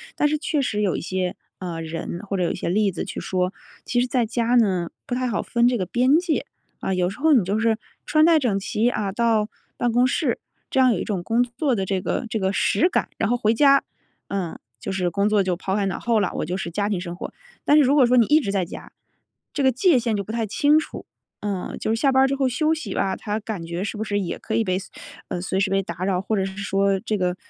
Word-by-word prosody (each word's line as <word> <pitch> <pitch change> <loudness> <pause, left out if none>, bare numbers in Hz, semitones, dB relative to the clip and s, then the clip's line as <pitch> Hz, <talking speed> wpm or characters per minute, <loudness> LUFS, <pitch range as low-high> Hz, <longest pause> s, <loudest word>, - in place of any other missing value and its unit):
但 295 - +2
是 305 0 0
确 300 -1 -1
实 210 -4 -1
有 195 -4 +1
一 - - -4
些， 185 +1 -2 0.2
呃 175 -3 -5
人， 165 +2 -5
或 195 - -2
者 180 - +1
有 - - +1
一 - - -3
些 - - -3
例 200 +2 +2
子 175 - -4
去 - - -6
说， 185 +1 -1 0.3
其 245 - +1
实 250 - 0
在 250 -2 +1
家 235 +2 0
呢， 185 -7 +2 0.2
不 - - -4
太 255 0 0
好 220 - -1
分 235 0 +2
这 245 -1 +2
个 185 - -1
边 255 - +3
界。 335 -3 0 0.3
啊， - - -2
有 180 0 +1
时 - - -11
候 315 +2 +3
你 230 -9 +4
就 205 +4 0
是 225 -1 +2 0.3
穿 310 0 +4
戴 330 -1 +5
整 235 -8 +1
齐， 215 +4 0
啊， 205 -5 -2
到 220 -1 +2 0.3
办 240 - +1
公 245 +2 +4
室， 255 - 0 0.3
这 - - +1
样 255 -1 +6
有 200 - 0
一 - - -2
种 195 -5 -2
工 230 +6 +2
作 250 +2 -1
的 195 -3 -1
这 190 -1 -1
个 245 - -2
这 220 0 -2
个 190 -1 +1
实 340 - +2
感。 - - 0
然 225 - +1
后 245 - +2
回 220 -2 +2
家， 275 +3 +5 0.5
嗯， 190 -4 -3 0.2
就 - - -5
是 180 -2 -1
工 200 +1 +1
作 210 -2 +3
就 185 -1 0
抛 190 +2 -2
开 205 -1 +1
脑 190 - -2
后 230 -2 +1
了， 200 - 0
我 - - -2
就 180 +4 -3
是 175 -3 -4
家 205 +3 -1
庭 195 -4 -1
生 175 -1 -6
活。 - - -6 0.3
但 295 - +5
是 295 - +7
如 270 +2 +3
果 270 -4 +5
说 250 +1 +4
你 235 - +6
一 300 +5 +5
直 205 -10 -2
在 195 -3 0
家， - - -10 0.6
这 285 - -1
个 265 -1 +4
界 270 - +3
限 230 -2 -1
就 200 - -2
不 210 - -7
太 230 -1 -1
清 290 +9 +4
楚， 315 - -7 0.4
嗯。 200 -3 -3
就 - - -1
是 225 - -2
下 275 -2 +4
班 265 0 +5
儿 270 - +4
之 275 - 0
后 270 -2 +1
休 310 +6 +1
息 260 -12 -4
吧， 195 -1 0
它 210 0 -3
感 210 -5 -5
觉 170 +3 -4
是 210 - -4
不 215 - -2
是 205 -2 -1
也 180 -4 -3
可 220 - -3
以 230 - +2
被 185 -2 0
随 195 - -11 0.4
呃， 180 - -2
随 190 +1 -1
时 195 - +1
被 195 0 +1
打 170 0 -6
扰， 190 -2 +1
或 220 - -1
者 195 - +1
是 190 0 -7
说 195 -1 +1
这 220 -1 -1
个 180 -1 0
210 Hz, 295 characters per minute, -23 LUFS, 190-245 Hz, 0.6 s, 是